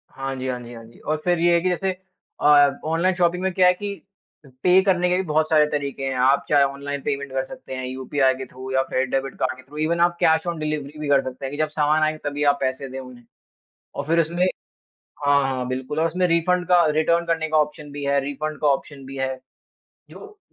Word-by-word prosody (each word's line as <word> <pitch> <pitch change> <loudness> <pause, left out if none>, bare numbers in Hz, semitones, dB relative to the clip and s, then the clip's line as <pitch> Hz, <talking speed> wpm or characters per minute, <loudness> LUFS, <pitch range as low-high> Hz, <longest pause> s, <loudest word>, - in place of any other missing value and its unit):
हाँ 135 0 -4
जी, 130 0 -5
हाँ 125 -1 -2
जी, 120 0 -10
हाँ 115 -1 -10
जी, 115 - -18
और 155 0 -2
फिर 175 -2 +1
ये 175 0 +4
है 170 - +3
कि 185 - +1
जैसे 190 +2 0 0.5
अ, 145 -1 +6 0.2
ऑनलाइन 165 +4 +1
शॉपिंग 180 0 +1
में 190 - +1
क्या 180 -1 +5
है 180 - +6
कि 200 +2 -5 0.5
अ, - - -15 0.2
पे 185 +1 +6
करने 180 -2 +2
के 180 - +2
भी - - +1
बहुत 155 +1 +2
सारे 155 -1 +5
तरीके 140 -2 -3
हैं, 135 -1 -2
आप 130 +2 +3
चाहे 145 -2 +5
ऑनलाइन 140 0 -3
पेमेंट 140 -1 -3
कर 130 0 -1
सकते 130 - -9
हैं 130 0 -4
यूपीआई 130 +1 +1
के 130 0 -6
थ्रू 130 +1 -9
या 130 0 +3
फिर 130 0 +1
डेबिट 135 0 -2
कार्ड 130 0 0
के 130 - -14
थ्रू 145 +4 -13
ईवन 165 +2 0
आप 175 - -8
कैश 160 +1 +3
ऑन 170 -2 -2
डिलीवरी 150 -1 -4
भी 150 - -4
कर 140 -1 +4
सकते 130 +1 -6
हैं 135 - -4
कि 145 - -6
जब 155 0 +1
सामान 150 +1 +2
आए 155 0 +1
तभी 145 0 -2
आप 140 - -9
पैसे 130 +1 -2
दें 135 +1 -6
उन्हें। 125 -2 -11 0.7
और 140 - -4
फिर 165 +1 +3
उसमे 170 +3 +1 0.8
हाँ, 140 0 +4
हाँ, 130 -2 -2
बिल्कुल 130 +4 -3
और 165 - +2
उसमें 180 +2 0
रिफंड 180 +2 +1
का, 175 -2 +5
रिटर्न 160 +2 +2
करने 165 -1 0
का 155 - +2
ऑप्शन 150 -1 -1
भी 145 0 -6
है, 140 0 +2
रिफंड 150 +2 -4
का 150 - +2
ऑप्शन 140 0 -1
भी 135 0 -8
है। 130 0 -2 0.7
जो, 420 0 -13
145 Hz, 245 wpm, -23 LUFS, 135-165 Hz, 0.8 s, अ